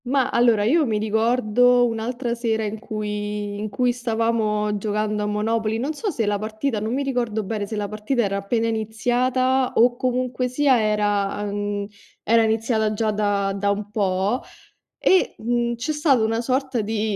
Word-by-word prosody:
Ma 265 +1 +1
allora, 235 -3 +3
io 305 +10 +3
mi 215 -2 0
ricordo 235 +3 +3
un'altra 235 +2 -2
sera 230 -2 -1
in 215 +1 -4
cui 210 -2 -4
in 215 +1 -3
cui 250 +4 +1
stavamo 225 -3 0
giocando 210 +1 -1
a - - -1
Monopoly, 220 +1 0
non 275 +7 -2
so 410 +8 -3
se 245 - -1
la 205 0 0
partita, 220 +3 -2
non 220 +4 -2
mi 280 - -1
ricordo 240 -5 -1
bene 205 0 -3
se 220 - -5
la 205 -1 -2
partita 215 +4 -1
era 200 -1 -1
appena 225 +4 -1
iniziata 245 +4 0
o 240 +1 +4
comunque 250 0 -1
sia 255 -1 +3
era, 205 -2 0
ehm, 205 0 -3 0.4
era 230 +1 +4
iniziata 220 -1 +1
già 215 0 0
da 205 -2 0
da 200 +1 -1
un 205 0 -2
po' 200 +2 0 0.6
e, 375 - +3
mhmm, 240 +1 -1
c'è 245 +6 -3
stata 290 -5 +3
una 225 +1 0
sorta 260 0 -1
di 215 0 -1
220 Hz, 170 wpm, -22 LUFS, 210-245 Hz, 0.6 s, o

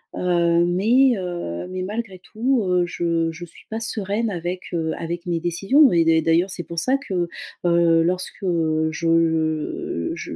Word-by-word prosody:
heu, 170 -1 +2
mais, 235 +9 +3
heu, 175 - -5
mais 185 0 -4
malgré 200 -2 -5
tout, 235 +4 -1
heu, 180 -1 +2
je 165 -1 -1
je 175 +2 -8
suis 170 - -18
pas 220 +1 -3
sereine 220 0 -1
avec, 175 +1 -4
heu, 160 -1 -1
avec 170 +2 -5
mes 170 -1 0
décisions. 195 - +4
Et 165 -1 +4
d’a 160 0 +4
d'ailleurs, 165 +4 +2
c'est 175 - -5
pour 170 +1 -4
ça 260 +8 +1
que, 185 -11 -3 0.4
heu, 170 -1 +4
lorsque, 185 +3 -3
heu, 160 -3 +1
je 165 - 0
je, - - -7
heu, - - -5
175 Hz, 175 wpm, -22 LUFS, 165-200 Hz, 0.4 s, décisions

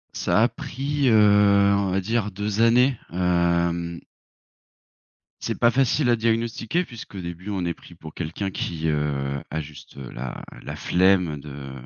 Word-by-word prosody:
Ça - - +2
a - - +5
pris, 140 0 -2
heu, 100 -2 +5
on 100 -1 0
va 95 +1 +1
dire 110 +2 -1
2 105 +2 -2
années, 125 +3 +4
hem 85 -1 0 1.4
C'est - - -3
pas 120 - +5
facile 135 +1 +2
à 120 - +5
diagnostiquer 115 +8 0
puisqu'au 115 -5 -9
début 85 +3 -7
on 95 -3 -2
est 85 - -1
pris 85 - -16
pour 80 -2 -11
quelqu'un 90 +4 -4
qui, 80 -3 -3
heu, 70 -2 -1
a 80 - -2
juste, 75 -2 -13
heu, 65 -3 -8
la 60 0 -6 0.2
la - - -6
flemme 90 -4 +2
de 70 -1 -9
95 Hz, 155 wpm, -24 LUFS, 80-115 Hz, 1.4 s, a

